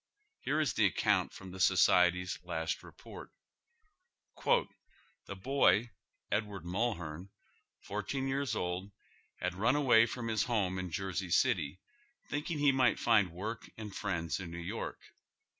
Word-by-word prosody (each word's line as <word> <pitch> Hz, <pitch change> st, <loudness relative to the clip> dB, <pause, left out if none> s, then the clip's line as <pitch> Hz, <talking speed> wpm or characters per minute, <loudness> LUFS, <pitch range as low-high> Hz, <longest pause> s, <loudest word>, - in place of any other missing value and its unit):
Here 150 Hz, +3 st, 0 dB
is 145 Hz, -8 st, +1 dB
the 105 Hz, -, +4 dB
account 90 Hz, -, +1 dB
from 95 Hz, -1 st, -10 dB
the 95 Hz, -, -9 dB
Society's 90 Hz, 0 st, +4 dB
last 80 Hz, -2 st, -3 dB
report: -, -, -11 dB, 0.6 s
" -, -, -42 dB
Tlie -, -, +3 dB, 0.8 s
boy, 125 Hz, -4 st, +3 dB, 0.4 s
Edward 105 Hz, -4 st, -2 dB
Mulhearn, 90 Hz, -3 st, -2 dB, 0.5 s
fourteen 105 Hz, +7 st, -3 dB
years 135 Hz, -3 st, -1 dB
old, 90 Hz, +1 st, -3 dB, 0.4 s
had 90 Hz, 0 st, -2 dB
run 115 Hz, +9 st, +2 dB
away 130 Hz, -6 st, +6 dB
f 120 Hz, -, -6 dB
i -, -, -5 dB
om 115 Hz, -, -3 dB
his 110 Hz, -3 st, +1 dB
home 95 Hz, -6 st, 0 dB
in 90 Hz, -1 st, -4 dB
Jersey 95 Hz, 0 st, -3 dB
City, 80 Hz, 0 st, +1 dB, 0.5 s
thinking 150 Hz, +2 st, -3 dB
he 145 Hz, -1 st, +4 dB
might 130 Hz, -4 st, +3 dB
find 110 Hz, -5 st, +3 dB
work 105 Hz, +7 st, -6 dB
and 105 Hz, -3 st, -7 dB
friends 85 Hz, -5 st, -2 dB
in 90 Hz, -3 st, -6 dB
New 85 Hz, -, -7 dB
York. 90 Hz, +6 st, -5 dB
100 Hz, 145 wpm, -33 LUFS, 90-120 Hz, 0.8 s, away